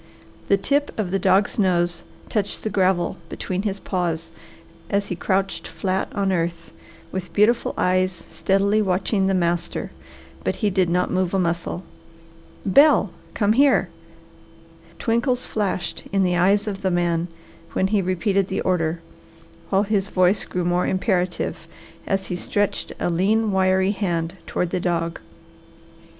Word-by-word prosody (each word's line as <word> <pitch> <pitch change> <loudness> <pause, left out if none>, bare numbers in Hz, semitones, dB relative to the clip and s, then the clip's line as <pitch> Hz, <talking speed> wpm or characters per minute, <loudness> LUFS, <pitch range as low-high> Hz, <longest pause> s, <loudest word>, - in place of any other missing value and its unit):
The 200 - +4
tip 285 +8 +1
of 200 -5 -2
the 195 - +1
dog's 190 +4 +2
nose 175 -3 +1 0.3
touched 205 -2 -2
the 215 - -2
gravel 185 -2 +1
between 185 0 -3
his 200 -1 -2
paws 170 -4 -2 0.6
as 200 0 +1
he 180 - -2
crouched 195 +2 -1
flat 190 0 -2
on 195 -1 +1
earth, 170 -2 -2 0.4
with 185 -1 -5
beautiful 220 +3 +2
eyes 185 -1 +1
steadily 200 +2 +1
watching 190 +1 +1
the 195 - +2
master, 175 -1 -1 0.5
but - - 0
he 210 -3 0
did 185 -2 +2
not 180 +1 +1
move 185 0 0
a - - +2
muscle. 170 0 -1 0.8
"Bel, 245 - +5 0.2
come 205 0 +3
here!" 275 +3 +4 1.1
Twinkles 245 +2 0
flashed 200 -4 -2
in 195 -1 +2
the 180 -1 +2
eyes 195 +4 +3
of 200 -2 -4
the 190 - +1
man 175 -1 +1 0.5
when 190 - +1
he 210 -1 +2
repeated 185 +1 +1
the 190 - -2
order, 165 -2 0 0.7
while 195 +1 +3
his 200 -2 0
voice 185 +2 +2
grew 180 -1 -3
more 175 +1 +1
imperative 185 -2 -1 0.4
as 195 0 0
he 180 - -3
stretched 205 +3 -1
a - - 0
lean, 210 +5 +2
wiry 190 0 +3
hand 175 -5 -1
toward 180 -1 -1
the 185 - 0
dog. 170 -2 -1
190 Hz, 145 wpm, -23 LUFS, 180-200 Hz, 1.1 s, Bel